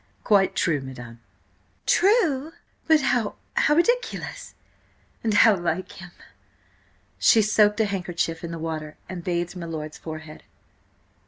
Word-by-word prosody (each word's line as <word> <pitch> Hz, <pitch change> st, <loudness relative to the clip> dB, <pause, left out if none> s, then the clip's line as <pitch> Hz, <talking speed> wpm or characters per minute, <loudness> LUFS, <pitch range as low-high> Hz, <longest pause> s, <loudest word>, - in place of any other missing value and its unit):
"Quite 200 Hz, -3 st, +3 dB
true, 155 Hz, -5 st, +1 dB
madam." 120 Hz, -3 st, -10 dB, 0.7 s
"True? 330 Hz, -, +2 dB, 0.3 s
But 315 Hz, -2 st, +5 dB
how–how 250 Hz, +3 st, 0 dB
ridiculous–and 475 Hz, -, -3 dB
how 220 Hz, 0 st, +6 dB
like 175 Hz, 0 st, -3 dB
him!" 180 Hz, -1 st, -11 dB, 1.1 s
She 225 Hz, -2 st, +5 dB
soaked 210 Hz, 0 st, +3 dB
a -, -, +3 dB
handkerchief 175 Hz, -4 st, -3 dB
in 170 Hz, -, -4 dB
the 165 Hz, -, -5 dB
water, 155 Hz, -2 st, -5 dB
and 180 Hz, -2 st, -7 dB
bathed 175 Hz, 0 st, -2 dB
my 170 Hz, -2 st, -6 dB
lord's 155 Hz, -2 st, -6 dB
forehead. 155 Hz, -1 st, -9 dB
185 Hz, 115 wpm, -24 LUFS, 165-230 Hz, 1.1 s, how